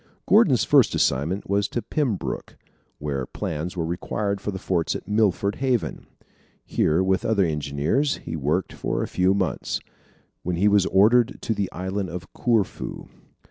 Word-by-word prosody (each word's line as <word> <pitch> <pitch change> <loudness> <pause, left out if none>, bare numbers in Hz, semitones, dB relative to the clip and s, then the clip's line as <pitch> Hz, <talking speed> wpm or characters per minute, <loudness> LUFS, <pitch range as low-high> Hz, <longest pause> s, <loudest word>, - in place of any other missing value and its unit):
Gordon's - - +5
first - - +4
assignment 80 +10 0
was 100 0 +1
to 120 - -3
Pembroke, 125 - -2 0.4
where 70 -4 -3
plans 80 +4 -4
were 85 - 0
required 100 +4 -2
for 105 - -3
the 95 - -3
forts 90 -3 -1
at - - -7
Milford 105 -1 +1
Haven. 130 -4 -1 0.6
Here 80 +5 +2
with 95 0 +1
other 100 -4 +2
engineers 75 - 0
he - - -6
worked 75 +5 -1
for - - -2
a - - -3
few 95 +1 +2
months, 95 -4 -1 0.6
when 90 0 -2
he 95 +5 +3
was 100 -2 +4
ordered 115 +5 +4
to 115 - 0
the 100 -3 -2
Island 95 +2 -3
of 90 +2 -8
Corfu. 115 -6 -1
95 Hz, 155 wpm, -24 LUFS, 85-105 Hz, 0.6 s, Gordon's